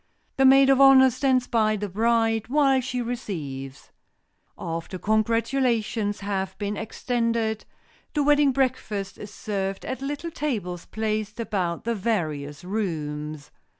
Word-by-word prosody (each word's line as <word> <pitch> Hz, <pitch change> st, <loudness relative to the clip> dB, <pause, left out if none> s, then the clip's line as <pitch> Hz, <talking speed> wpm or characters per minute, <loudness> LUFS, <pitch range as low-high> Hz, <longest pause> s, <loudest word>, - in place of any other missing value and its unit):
The 270 Hz, -, +4 dB
maid 270 Hz, +1 st, +7 dB
of 270 Hz, 0 st, +4 dB
honor 265 Hz, -1 st, +8 dB
stands 255 Hz, 0 st, +1 dB
by 215 Hz, -3 st, +2 dB
the 205 Hz, 0 st, -3 dB
bride 225 Hz, +2 st, +1 dB
while 270 Hz, 0 st, +3 dB
she 250 Hz, -1 st, -3 dB
receives. 145 Hz, -, -6 dB, 0.7 s
After 165 Hz, +3 st, -5 dB
congratulations 225 Hz, 0 st, 0 dB
have 195 Hz, -1 st, -3 dB
been 205 Hz, 0 st, -3 dB
extended, 230 Hz, 0 st, -1 dB, 0.5 s
the 295 Hz, -, +2 dB
wedding 290 Hz, -1 st, +4 dB
breakfast 245 Hz, -7 st, -2 dB
is 205 Hz, -, -8 dB
served 195 Hz, -3 st, -4 dB
at 260 Hz, -, -4 dB
little 290 Hz, +4 st, -4 dB
tables 205 Hz, -, -3 dB
placed 215 Hz, 0 st, -3 dB
about 185 Hz, -7 st, -2 dB
the 235 Hz, -, 0 dB
various 155 Hz, -9 st, -2 dB
rooms. 155 Hz, -7 st, -4 dB
220 Hz, 125 wpm, -25 LUFS, 190-255 Hz, 0.7 s, honor